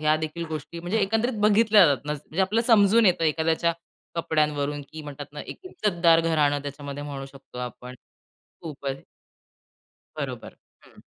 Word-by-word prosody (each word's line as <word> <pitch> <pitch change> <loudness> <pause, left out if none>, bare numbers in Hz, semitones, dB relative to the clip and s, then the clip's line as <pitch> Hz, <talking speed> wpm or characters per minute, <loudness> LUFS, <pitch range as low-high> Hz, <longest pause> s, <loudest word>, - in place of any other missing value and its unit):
ह्या 155 0 +3
देखील 155 +2 -4
गोष्टी 160 +2 -6
म्हणजे 175 +6 -1
एकंदरीत 225 +3 0
बघितल्या 210 -1 +6
जातात 140 -2 0
ना 150 - -1
म्हणजे 150 +4 -5
आपलं 210 +5 +1
समजून 220 -1 +5
येतं 175 -2 +3
एखाद्याच्या 160 +2 +1 0.4
कपड्यांवरून 150 -3 0
की 155 - -7
म्हणतात 145 -1 -8
ना 150 - -7
एक - - -9
इज्जतदार 170 - +2
घराणं 150 -3 +1
त्याच्यामध्ये 145 0 -6
म्हणू 140 -2 -6
शकतो 135 -2 -13
आपण, 125 0 -7 0.7
खूपच. 140 -4 -5 1.1
बरोबर, - - -6 0.3
हं. - - -19
155 Hz, 145 wpm, -25 LUFS, 145-185 Hz, 1.1 s, बघितल्या